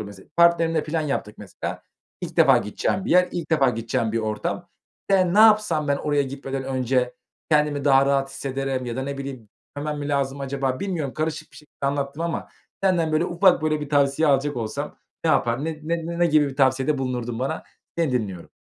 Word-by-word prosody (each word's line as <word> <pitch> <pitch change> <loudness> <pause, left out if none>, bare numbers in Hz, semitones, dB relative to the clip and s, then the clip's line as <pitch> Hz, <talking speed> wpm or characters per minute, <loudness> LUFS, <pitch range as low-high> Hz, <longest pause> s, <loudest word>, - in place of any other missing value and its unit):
Mesela, 100 -2 -10
partnerimle 165 -2 +4
plan 160 +1 -1
yaptık. 140 -8 -3
Mesela, 100 -3 -6 0.4
ilk - - -6
defa - - +6
gideceğim 145 - -2
bir - - -3
yer, 180 +1 +5
ilk 170 -3 -4
defa 140 -5 +4
gideceğim 115 -1 -2
bir 115 - +1
ortam. 110 -1 -3 0.4
Ben 185 -2 +3
ne - - +3
yapsam 210 -9 +5
ben 140 - +2
oraya 145 0 +1
gitmeden 135 0 -5
önce 130 -1 0 0.4
kendimi 150 -2 +2
daha 135 -1 +5
rahat 135 -1 +1
hissederim 135 -2 -3
ya 120 - -4
da 130 - -2
ne 140 +1 -4
bileyim, 135 -6 -7 0.3
hemen 150 +1 -3
mi 145 - -4
lazım 140 -1 -1
acaba, 135 -1 -2
bilmiyorum. 170 -9 -3
Karışık 155 0 -3
bir - - -15
şekilde 145 -2 -7
anlattım 140 +2 -2
ama 170 -1 -3 0.3
senden, 175 -5 +2
böyle, 155 +3 +2
ufak, 175 -1 +3
böyle, 155 -1 0
bir 150 - -5
tavsiye 145 +2 +2
alacak 140 0 +2
olsam 110 -2 -4 0.3
ne - - +3
yapardın? 120 +4 +1
Ne 160 -1 -3 0.3
ne 170 0 -4
ne 175 - +4
gibi 150 -3 +3
bir 135 - -9
tavsiyede 135 +1 +2
bulunurdun 125 -3 -3
bana? 135 +5 -2 0.4
Seni 160 -6 +1
dinliyorum. 100 -8 -3
140 Hz, 195 wpm, -24 LUFS, 130-155 Hz, 0.4 s, defa